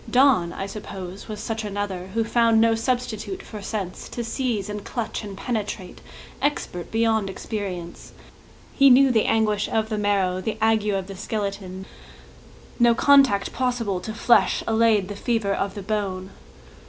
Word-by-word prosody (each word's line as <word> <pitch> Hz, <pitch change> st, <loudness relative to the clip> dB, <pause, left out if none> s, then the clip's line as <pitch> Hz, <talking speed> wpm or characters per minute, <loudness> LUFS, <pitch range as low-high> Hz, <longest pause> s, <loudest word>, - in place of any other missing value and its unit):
Donne, 245 Hz, -9 st, +4 dB
I 195 Hz, -, -4 dB
suppose, 195 Hz, -2 st, -8 dB
was 215 Hz, -2 st, -6 dB
such 225 Hz, +1 st, -3 dB
another 200 Hz, -3 st, -4 dB
Who 225 Hz, -, +2 dB
found 230 Hz, 0 st, +3 dB
no 225 Hz, 0 st, +4 dB
substitute 245 Hz, -, -2 dB
for 210 Hz, -2 st, -9 dB
sense; 195 Hz, -3 st, -5 dB
To 240 Hz, -, -4 dB
seize 230 Hz, -4 st, -2 dB
and 210 Hz, -1 st, -5 dB
clutch 230 Hz, -2 st, -4 dB
and 200 Hz, -2 st, -7 dB
penetrate, 210 Hz, -4 st, -4 dB, 0.4 s
Expert 280 Hz, -11 st, -2 dB
beyond 225 Hz, -3 st, +1 dB
experience, 190 Hz, -4 st, -6 dB, 0.6 s
He 275 Hz, 0 st, +6 dB
knew 265 Hz, +1 st, +6 dB
the 225 Hz, -3 st, +3 dB
anguish 215 Hz, -2 st, +1 dB
of 220 Hz, 0 st, 0 dB
the 215 Hz, -2 st, -2 dB
marrow 195 Hz, -3 st, +1 dB
The 215 Hz, +3 st, -3 dB
ague 220 Hz, -1 st, +2 dB
of 195 Hz, -2 st, 0 dB
the 195 Hz, 0 st, -8 dB
skeleton; 195 Hz, -2 st, -4 dB, 0.9 s
No 235 Hz, -1 st, +5 dB
contact 270 Hz, -7 st, +4 dB
possible 245 Hz, -7 st, -1 dB
to 220 Hz, -, -6 dB
flesh 235 Hz, +1 st, +3 dB
Allayed 220 Hz, -3 st, +3 dB
the 205 Hz, -, -6 dB
fever 220 Hz, -2 st, 0 dB
of 195 Hz, 0 st, -2 dB
the 200 Hz, -, -6 dB
bone. 195 Hz, -2 st, -3 dB
215 Hz, 155 wpm, -24 LUFS, 195-230 Hz, 0.9 s, He